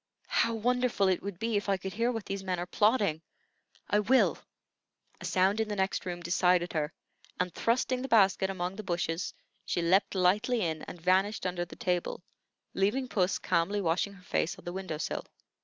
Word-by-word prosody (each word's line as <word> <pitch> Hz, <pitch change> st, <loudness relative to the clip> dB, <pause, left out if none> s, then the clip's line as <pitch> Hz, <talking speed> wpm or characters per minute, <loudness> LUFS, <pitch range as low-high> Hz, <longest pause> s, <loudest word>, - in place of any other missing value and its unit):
How 230 Hz, 0 st, +2 dB
wonderful 245 Hz, -3 st, +1 dB
it 185 Hz, -, +1 dB
would 200 Hz, -3 st, -5 dB
be 225 Hz, +2 st, 0 dB
if 205 Hz, 0 st, -2 dB
I 195 Hz, -, +3 dB
could 190 Hz, +1 st, -6 dB
hear 235 Hz, +3 st, +1 dB
what 225 Hz, -4 st, -4 dB
these 195 Hz, 0 st, -4 dB
men 185 Hz, -1 st, -1 dB
are 175 Hz, -, -3 dB
plotting. 205 Hz, -5 st, +2 dB, 0.7 s
I 210 Hz, -, +3 dB
will!" 255 Hz, +5 st, +3 dB, 0.8 s
A -, -, -7 dB
sound 190 Hz, +3 st, +2 dB
in 220 Hz, -, -1 dB
the 210 Hz, -, -3 dB
next 190 Hz, -1 st, -1 dB
room 175 Hz, -1 st, -4 dB
decided 175 Hz, +1 st, +2 dB
her; 155 Hz, -1 st, -1 dB, 0.5 s
and, 180 Hz, -1 st, -1 dB
thrusting 250 Hz, +2 st, +1 dB
the 265 Hz, -, -3 dB
basket 195 Hz, -5 st, +4 dB
among 185 Hz, 0 st, -3 dB
the 215 Hz, -, -5 dB
bushes, 175 Hz, -1 st, -2 dB, 0.3 s
she 175 Hz, -, -1 dB
leaped 190 Hz, +4 st, +3 dB
lightly 210 Hz, +6 st, +2 dB
in 160 Hz, -4 st, -1 dB
and 175 Hz, -, -8 dB
vanished 190 Hz, +4 st, +2 dB
under 175 Hz, -1 st, -1 dB
the -, -, -12 dB
table, 180 Hz, 0 st, -2 dB, 0.5 s
leaving 225 Hz, +7 st, +1 dB
puss 190 Hz, -5 st, +1 dB
calmly 185 Hz, +3 st, 0 dB
washing 180 Hz, +2 st, 0 dB
her 185 Hz, -2 st, -16 dB
face 175 Hz, -1 st, -1 dB
on -, -, -15 dB
the 175 Hz, -, -4 dB
window 185 Hz, -5 st, -4 dB
sill. 160 Hz, -, -3 dB
190 Hz, 190 wpm, -30 LUFS, 175-210 Hz, 0.8 s, basket